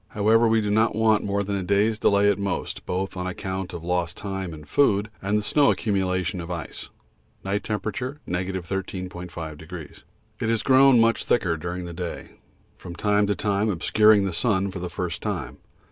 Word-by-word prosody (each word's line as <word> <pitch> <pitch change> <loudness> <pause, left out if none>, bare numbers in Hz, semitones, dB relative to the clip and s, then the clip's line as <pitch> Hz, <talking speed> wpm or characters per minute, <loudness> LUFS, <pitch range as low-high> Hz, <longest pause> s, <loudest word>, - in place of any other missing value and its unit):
However, 110 +3 +4
we 110 0 +3
do 105 -1 -1
not 110 +1 +2
want 110 -1 +3
more 100 0 0
than 100 0 -2
a 95 - -1
day's 100 +4 +1
delay 100 -1 +4
at 100 -1 +2
most, 100 -3 -3
both 95 +2 -2
on 90 0 -3
account 95 0 -4
of 85 - -7
lost 90 -1 -1
time 95 -3 -4
and 75 -2 -10
food 105 - +2
and 100 +2 +1
the 105 - -1
snow 145 +6 +3
accumulation 95 -3 0
of 85 - -8
ice. 85 -2 -6 0.5
(Night 100 +2 -1
T. 110 - -3
13.5°.) 90 - -5 0.4
It - - -1
has 115 -2 +1
grown 135 -1 +6
much 115 0 +3
thicker 90 -8 +2
during 90 +2 -5
the 85 - -7
day, 85 0 -6 0.5
from 85 -2 -9
time 105 +1 +2
to 100 - +1
time 105 +1 0
obscuring 105 +2 +4
the 95 - -2
sun 95 +1 0
for 95 - -6
the 90 0 -4
first 90 -2 -4
time. - - -4
100 Hz, 180 wpm, -24 LUFS, 90-105 Hz, 0.5 s, grown